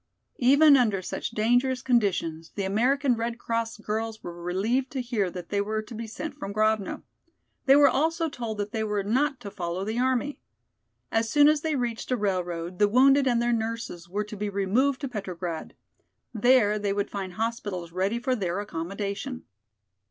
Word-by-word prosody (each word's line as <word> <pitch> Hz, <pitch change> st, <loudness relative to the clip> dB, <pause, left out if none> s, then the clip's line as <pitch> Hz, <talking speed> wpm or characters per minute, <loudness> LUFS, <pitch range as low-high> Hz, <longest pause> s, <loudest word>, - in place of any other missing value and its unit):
Even 280 Hz, +3 st, +7 dB
under 215 Hz, -6 st, +2 dB
such -, -, -4 dB
dangerous 245 Hz, +4 st, +1 dB
conditions 180 Hz, -9 st, 0 dB
the 200 Hz, -, -2 dB
American 250 Hz, +7 st, +2 dB
Red 230 Hz, +1 st, -3 dB
Cross 230 Hz, -1 st, -2 dB
girls 220 Hz, +1 st, -4 dB
were 175 Hz, -, -6 dB
relieved 215 Hz, +10 st, 0 dB
to 270 Hz, -, -2 dB
hear 235 Hz, -6 st, -1 dB
that 175 Hz, -1 st, -8 dB
they 200 Hz, -1 st, +1 dB
were 215 Hz, +1 st, -2 dB
to 225 Hz, -, -11 dB
be 225 Hz, 0 st, -5 dB
sent 310 Hz, +8 st, -6 dB
from 200 Hz, -, -5 dB
Grovno. 215 Hz, -1 st, 0 dB, 0.6 s
They 270 Hz, -, +8 dB
were 290 Hz, 0 st, +7 dB
also 325 Hz, +4 st, +1 dB
told 235 Hz, -7 st, -5 dB
that 205 Hz, 0 st, -3 dB
they 220 Hz, -1 st, -1 dB
were 210 Hz, -2 st, -1 dB
not 265 Hz, +7 st, +1 dB
to 200 Hz, -, -7 dB
follow 180 Hz, 0 st, -3 dB
the 220 Hz, +3 st, -2 dB
army. 260 Hz, +2 st, 0 dB, 0.7 s
As 225 Hz, 0 st, +1 dB
soon 290 Hz, +4 st, +6 dB
as 305 Hz, -1 st, +3 dB
they 315 Hz, -1 st, -1 dB
reached 240 Hz, -3 st, -3 dB
a 255 Hz, -, +1 dB
railroad, 180 Hz, -4 st, -2 dB
the 205 Hz, -, +5 dB
wounded 270 Hz, +4 st, +5 dB
and 240 Hz, -2 st, +3 dB
their 240 Hz, 0 st, +1 dB
nurses 225 Hz, -6 st, -4 dB
were 205 Hz, +3 st, -1 dB
to 210 Hz, +1 st, -8 dB
be 210 Hz, 0 st, -3 dB
removed 215 Hz, +8 st, +1 dB
to 275 Hz, -, -2 dB
Petrograd. 185 Hz, -7 st, -5 dB, 0.6 s
There 220 Hz, -2 st, +4 dB
they 205 Hz, -1 st, 0 dB
would 200 Hz, +1 st, -2 dB
find 190 Hz, -2 st, -4 dB
hospitals 205 Hz, -5 st, -3 dB
ready 190 Hz, +6 st, 0 dB
for 255 Hz, +2 st, 0 dB
their 185 Hz, -4 st, -2 dB
accommodation. 200 Hz, +7 st, -4 dB
220 Hz, 180 wpm, -27 LUFS, 200-250 Hz, 0.7 s, They